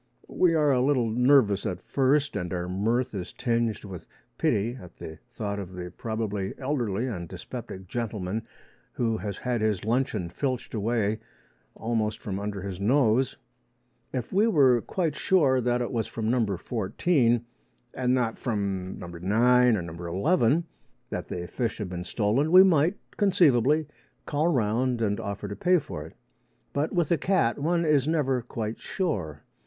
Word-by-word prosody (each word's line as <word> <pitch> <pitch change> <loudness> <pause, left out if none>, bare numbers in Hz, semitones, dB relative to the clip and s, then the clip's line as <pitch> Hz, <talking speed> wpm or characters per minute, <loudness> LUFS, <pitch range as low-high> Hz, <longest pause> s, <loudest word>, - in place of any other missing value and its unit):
We 170 -2 +3
are 150 -2 +3
a 125 -2 +3
little 125 -4 +2
nervous 125 -4 +4
at 95 -5 -3
first, 140 +2 +1
and 90 -1 -3
our 90 -1 -2
mirth 115 +7 0
is 95 -3 -5
tinged 115 -3 -1
with 95 -4 -9 0.3
pity 110 +5 +1
at 90 - -13
the 80 0 -9
thought 105 -4 -4
of 95 -2 -7
the 90 -1 -7
probably 105 -3 -3
elderly 125 -6 -1
and 90 -10 -5
dyspeptic 95 0 -8
gentleman 110 -2 -3 0.5
who 115 -2 0
has 100 -3 -5
had 125 -3 -2
his 105 -3 0
luncheon 110 -6 0
filched 130 +3 -3
away 110 -1 0 0.6
almost 110 -2 -1
from 100 -2 -4
under 100 -1 -4
his 95 -2 -5
nose. 125 +2 +2 0.7
If 125 +3 -4
we 205 +4 +4
were 135 - +4
quite 165 - -1
sure 140 -10 +3
that 120 0 +1
it 120 - -4
was 115 -3 -1
from 110 0 -2
No. 110 -7 +1
14, 120 - +1 0.5
and 125 -1 +1
not 120 -3 -1
from 100 -5 -2
No. - - -8
9 115 +8 +3
or - - -2
No. 85 -1 -7
11, 135 - +2 0.5
that - - -4
the 90 0 -4
fish 115 +5 -3
had 105 -4 -4
been 90 -1 -5
stolen, 120 +11 +1
we 185 +1 +10
might 175 +1 +3 0.2
conceivably 155 - +4 0.4
call 150 +2 0
round 125 -3 +1
and 105 -3 0
offer 100 0 -4
to 100 - -5
pay 180 - +3
for 75 - -5
it. - - -17 0.6
But 145 +3 0
with 175 -4 0
a 170 - +3
cat 170 -11 +1
one 170 +3 +1
is 150 -3 +3
never 140 -6 +1
quite 115 -2 -5
sure. 90 - -3
115 Hz, 165 wpm, -27 LUFS, 100-135 Hz, 0.7 s, we